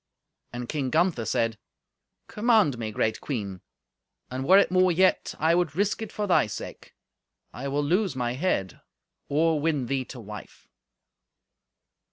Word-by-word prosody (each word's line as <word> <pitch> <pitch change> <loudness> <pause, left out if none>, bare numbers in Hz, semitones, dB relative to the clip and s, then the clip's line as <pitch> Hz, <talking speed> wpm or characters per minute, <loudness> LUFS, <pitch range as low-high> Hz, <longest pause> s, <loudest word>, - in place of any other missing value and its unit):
And 120 0 -6
King 140 -2 -2
Gunther 160 -6 +1
said, 115 -1 0 0.7
"Command 210 - +2
me, 110 -2 -3
great 110 +1 -1
queen, 100 -9 -4 0.7
and 130 +1 -4
were 190 +3 +8
it 200 - +4
more 185 0 +4
yet, 185 +2 +2
I 160 +2 +3
would 170 -4 +1
risk 205 +4 0
it 220 - -5
for 210 - -2
thy 185 - +3
sake. 105 - -8 0.6
I 130 +4 -5
will 145 +2 0
lose 180 +3 +1
my 120 -2 -1
head, 125 - -2 0.5
or 155 +2 +2
win 150 -4 0
thee 130 +2 -1
to 125 - -10
wife." 105 -2 -11
145 Hz, 150 wpm, -26 LUFS, 120-180 Hz, 0.7 s, were